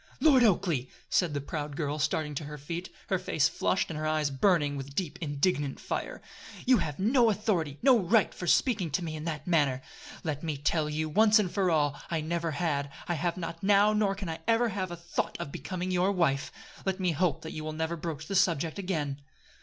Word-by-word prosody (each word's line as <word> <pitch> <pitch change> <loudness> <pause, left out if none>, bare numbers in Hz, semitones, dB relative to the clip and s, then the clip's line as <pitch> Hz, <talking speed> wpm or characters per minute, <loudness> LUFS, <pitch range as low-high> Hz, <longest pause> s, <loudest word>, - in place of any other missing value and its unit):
"Lord 275 -6 +6
Oakleigh!" 175 - +2 0.2
said 170 -5 +2
the - - 0
proud 145 0 -5
girl 150 -1 -2
starting 150 0 0
to 145 +1 -4
her 150 +1 -7
feet, 165 +5 -5 0.2
her 190 -2 +1
face 160 -4 +2
flushed 185 +2 0
and 155 - -4
her 155 - -1
eyes 155 -2 +1
burning 145 0 +2
with 140 0 -7
deep 180 -3 -2
indignant 145 -1 0
fire, - - -4 0.4
"you 255 -2 +5
have 145 -2 -3
no 235 +4 +4
authority 185 -9 0
no 260 -3 +6
right 210 +3 +3
for 175 - -6
speaking 200 - +2
to 150 +5 -1
me 160 -2 -4
in 155 0 -6
that 155 -3 -4
manner. 145 -7 +2 0.4
Let 150 -3 -2
me 155 -3 -3
tell 150 +2 0
you, 155 +1 -1
once 215 +6 +5
for 190 -1 +1
all, 145 -3 +1
I 165 - 0
never 165 +2 -2
had, 145 -3 -1 0.2
I 175 - 0
have 170 +2 -1
not 165 -1 -5
now, 205 +1 +5
nor 210 -2 +2
can 195 -1 -5
I 160 0 -4
ever 230 +1 +3
have 190 -2 -3
a 175 - -6
thought 170 +1 -3
of 160 -5 -5
becoming 180 +7 -4
your 180 +2 +2
wife. 160 -7 +1 0.3
Let 190 0 -1
me 180 -2 +1
hope 170 +1 0
that 160 - -6
you 155 - -5
will 155 - -3
never 160 +2 -2
broach 155 -2 -5
the 200 - -5
subject 170 -3 +2
again." 150 -7 -2
165 Hz, 215 wpm, -29 LUFS, 150-190 Hz, 0.4 s, Lord